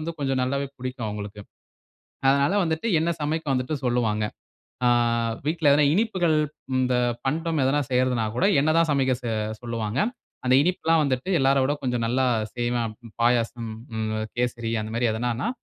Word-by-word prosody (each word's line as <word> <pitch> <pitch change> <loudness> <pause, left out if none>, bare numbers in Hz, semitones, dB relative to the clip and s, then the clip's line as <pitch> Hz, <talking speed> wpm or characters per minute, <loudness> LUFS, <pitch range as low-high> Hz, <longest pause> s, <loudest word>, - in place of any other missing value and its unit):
வந்து 165 +2 -4
கொஞ்சம் 135 -2 0
நல்லாவே 140 +2 -1
பிடிக்கும் 125 -2 -4
அவுங்களுக்கு. 105 0 -6 0.9
அதனால 140 +5 +3
வந்துட்டு 160 +5 -1
என்ன 165 +2 0
சமைக்க 155 +2 -1
வந்துட்டு 130 +3 -1
சொல்லுவாங்க. 115 -3 +1 0.6
ஆ - - +5 0.6
வீட்ல 160 -1 +2
எதுனா 145 +1 +5
இனிப்புகள், 185 -6 +2 0.4
இந்த 130 0 +1 0.3
பண்டம் 160 +3 0
எதனா 140 +3 +2
செய்யறதுனா 125 -2 +2
கூட, 145 - +2 0.2
என்ன 150 - +2
தான் 165 0 +4
சமைக்க 135 -2 +2
செ 120 - -5 0.3
சொல்லுவாங்க. 115 0 -3 0.5
அந்த 125 - +3
இனிப்புல்லாம் 165 -2 +2
வந்துட்டு 130 +3 -1
எல்லார 135 +1 +3
விட 145 - +1
கொஞ்சம் 125 -2 0
நல்லா 130 +3 +1 0.3
செய்வேன். 120 -2 -1 0.3
பாயாசம் 120 -1 +1 0.3
ம் 110 0 -1 0.3
கேசரி 120 -2 -1
அந்த 110 +1 -6
மாதிரி 120 0 +2
எதனான்னா, 120 +3 -1
130 Hz, 150 wpm, -25 LUFS, 120-150 Hz, 0.9 s, ஆ